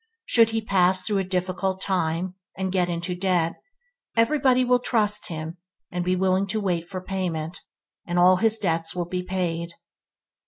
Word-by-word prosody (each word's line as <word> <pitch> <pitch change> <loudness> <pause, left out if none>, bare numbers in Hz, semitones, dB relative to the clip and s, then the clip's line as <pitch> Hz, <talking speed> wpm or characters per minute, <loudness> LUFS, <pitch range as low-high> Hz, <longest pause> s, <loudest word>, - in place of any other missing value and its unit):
Should 230 -2 +5
he 225 0 -1
pass 185 -2 +2
through 205 -2 0
a - - 0
difficult 185 +1 -2
time, 180 -1 -1 0.2
and, 190 -1 -2
get 180 -2 +1
into 175 +1 -2
debt, 180 -2 0 0.6
everybody 255 +1 +3
will 250 0 +4
trust 210 -4 +1
him 160 +1 -6 0.3
and 180 0 -2
be 180 +1 +1
willing 190 +1 +1
to 215 +3 -1
wait 175 -4 -1
for 185 -1 -5
payment, 180 -3 -3 0.5
and 175 0 -1
all 180 +1 +6
his 225 +2 +2
debts 165 -5 0
will 175 -1 -2
be 180 +1 -2
paid. 175 -2 -3
185 Hz, 165 wpm, -25 LUFS, 175-200 Hz, 0.6 s, all